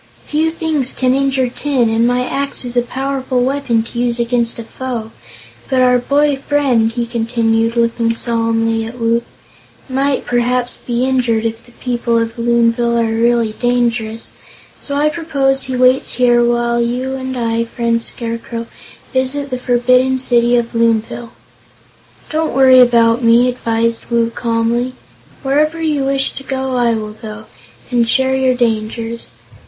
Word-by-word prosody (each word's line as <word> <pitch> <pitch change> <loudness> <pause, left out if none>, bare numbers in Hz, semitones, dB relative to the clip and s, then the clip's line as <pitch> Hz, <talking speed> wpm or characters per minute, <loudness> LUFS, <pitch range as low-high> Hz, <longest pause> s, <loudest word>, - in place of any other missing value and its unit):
"Few 310 +2 0
things 315 -5 -1
can 255 -1 +1
injure 270 -1 +1
tin, 255 -1 0
and 230 +1 +2
my 250 +1 +1
axe 280 -2 -2
is 245 0 -5
a 245 - +4
powerful 260 0 -2
weapon 260 -4 0
to 235 +1 -7
use 240 0 0
against 235 -1 0
a 230 - -5
foe. 235 -2 -6 0.6
But 260 -2 +2
our 250 0 +4
boy 285 +2 +1
friend," 265 -5 +1
he 235 0 -2
continued, 230 -1 0
looking 230 0 +1
solemnly 225 -1 0
at 240 +2 -9
Woot, 230 0 +1 0.6
"might 270 +1 0
perhaps 245 0 0
be 240 +1 -2
injured 245 -4 +1
if 225 +1 -4
the - - -17
people 240 -2 -1
of 230 +1 -2
Loonville 235 0 +2
are 225 -1 +1
really 235 -1 +2
dangerous; 235 -2 -1 0.4
so 280 - -6
I 295 +1 +2
propose 280 -4 0
he 260 - -3
waits 255 +1 +3
here 240 -1 +3
while 235 0 +1
you 250 +3 -2
and 260 -1 -4
I, 230 -1 0
Friend 230 0 -1
Scarecrow, 230 0 -4 0.5
visit 265 +2 -1
the 255 - -2
forbidden 255 +1 +2
City 240 -1 +2
of 235 -1 -2
Loonville." 230 0 0 1.0
"Don't 315 0 -1
worry 260 -1 +7
about 235 -1 +4
me," 235 +2 +5
advised 230 -2 -1
Woot, 235 -1 +1
calmly. 235 +2 -1 0.5
"Wherever 300 +4 +1
you 300 -4 0
wish 270 0 0
to - - -8
go, 265 -1 -3
I 240 -2 +2
will 215 -1 -5
go, 215 0 -9 0.5
and 235 -2 +2
share 265 +1 +2
your 260 -1 +2
dangers. 230 0 -2
240 Hz, 155 wpm, -16 LUFS, 230-260 Hz, 1.0 s, worry